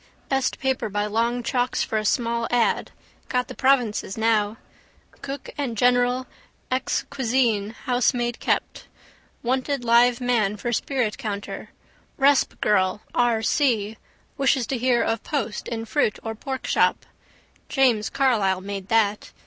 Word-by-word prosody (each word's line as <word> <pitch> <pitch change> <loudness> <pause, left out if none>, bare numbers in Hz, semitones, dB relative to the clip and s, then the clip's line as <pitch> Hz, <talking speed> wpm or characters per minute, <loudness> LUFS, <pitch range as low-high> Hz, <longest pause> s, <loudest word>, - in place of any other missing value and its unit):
Best 270 -1 0
paper 265 -4 -1
by 205 +1 -1
long 230 +3 0
chalks 250 0 0
for 220 - -1
a 215 - -4
small 235 +1 0
ad. 240 -2 +1 0.4
Got 250 -1 0
the - - -6
provinces 245 -7 +1
now. 220 -1 +1 0.6
Cook 275 0 -6
and 245 -6 -2
general, 245 +2 +3 0.5
exc. 255 +1 -1
cuisine, 235 -5 0
housemaid 245 -1 +1
kept. - - -2 0.6
Wanted 260 +2 -1
live 240 +1 +4
man 225 -5 +1
for 240 +3 -3
spirit 245 -2 -1
counter. 205 -5 -5 0.5
Resp. 275 0 +3
girl 190 -1 +2
(R.C.) 225 -2 +1 0.4
wishes 270 -2 +2
to 260 +4 -2
hear 245 -1 +2
of 225 -1 -1
post 270 -8 -3
in 225 -1 -4
fruit 225 -3 +1
or 225 - -3
pork 265 +4 -5
shop. - - +2 0.6
James 245 -6 +2
Carlisle 215 -9 +1
made 195 -1 -6
that. 215 -2 +1
240 Hz, 135 wpm, -24 LUFS, 215-255 Hz, 0.6 s, live